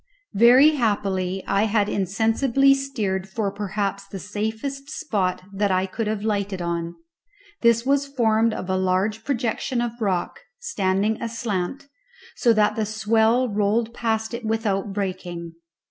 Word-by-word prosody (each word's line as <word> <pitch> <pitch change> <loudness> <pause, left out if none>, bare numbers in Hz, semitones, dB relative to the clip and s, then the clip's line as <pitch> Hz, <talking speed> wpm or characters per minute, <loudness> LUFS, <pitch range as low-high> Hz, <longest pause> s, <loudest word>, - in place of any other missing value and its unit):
Very 250 +8 +7
happily 195 -5 0
I 200 +2 +2
had 210 -1 +1
insensibly 225 +8 +2
steered 210 -9 -2
for 200 0 -2
perhaps 200 0 -3
the 195 - -7
safest 220 +8 -4
spot 200 - -2
that 200 +1 +1
I 185 0 +2
could 215 +3 -4
have 210 -1 -2
lighted 200 -3 -1
on; 170 -1 -3 0.7
this 235 0 +4
was 280 +1 +2
formed 230 -4 +2
of 185 - -5
a 190 0 0
large 190 +4 0
projection 245 -1 -1
of 240 -1 -1
rock, 185 -4 -1 0.2
standing 210 - 0
aslant, 230 +2 -3 0.5
so 240 - +3
that 215 -2 +3
the 220 -2 -1
swell 220 +3 +2
rolled 215 +2 0
past 225 -1 -1
it 235 +1 -5
without 215 -3 -1
breaking. 180 -4 -4
215 Hz, 140 wpm, -23 LUFS, 195-235 Hz, 0.7 s, Very